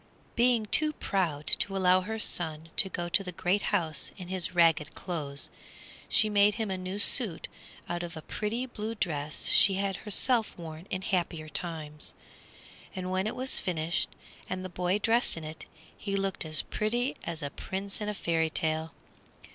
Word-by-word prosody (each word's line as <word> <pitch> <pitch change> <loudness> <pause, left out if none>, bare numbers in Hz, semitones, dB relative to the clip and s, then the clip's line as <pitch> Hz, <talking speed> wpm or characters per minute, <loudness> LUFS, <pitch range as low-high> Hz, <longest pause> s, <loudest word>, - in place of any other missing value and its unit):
Being 240 -2 +3
too 305 +8 +4
proud 165 - -2
to 195 -1 +3
allow 185 0 +4
her 220 +4 -4
son 160 -6 -1
to 190 - +5
go 175 -2 -3
to 190 +3 +2
the 180 - -6
great 180 +3 0
house 160 -4 0
in 180 -2 -9
his 185 -1 -1
ragged 165 -3 +3
clothes, 145 -6 -3 0.6
she 215 - +5
made 205 0 +4
him 220 -4 -2
a - - 0
new 185 +2 -5
suit 205 - +5 0.4
out 175 0 -3
of 170 -1 -6
a 155 - -8
pretty 225 +4 -3
blue 225 -2 -5
dress 155 -6 -2
she 200 -1 +6
had 195 0 -1
herself 225 +2 +1
worn 165 +1 -9
in 185 -1 -3
happier 170 -5 -2
times, 155 -3 -3 0.8
and 185 -1 -4
when 190 +2 0
it - - -3
was 260 +1 +2
finished 170 0 0 0.4
and 185 0 -4
the - - -5
boy 180 +2 0
dressed 225 -2 +1
in 165 - -6
it, 155 +1 -8 0.3
he 200 -1 -4
looked 195 -3 -1
as 155 -1 +3
pretty 240 +5 -1
as 165 -2 -4
a 140 - -4
prince 195 +5 -5
in 210 - -2
a 210 - -3
fairy 165 -3 0
tale. 160 0 0
185 Hz, 180 wpm, -29 LUFS, 165-205 Hz, 0.8 s, she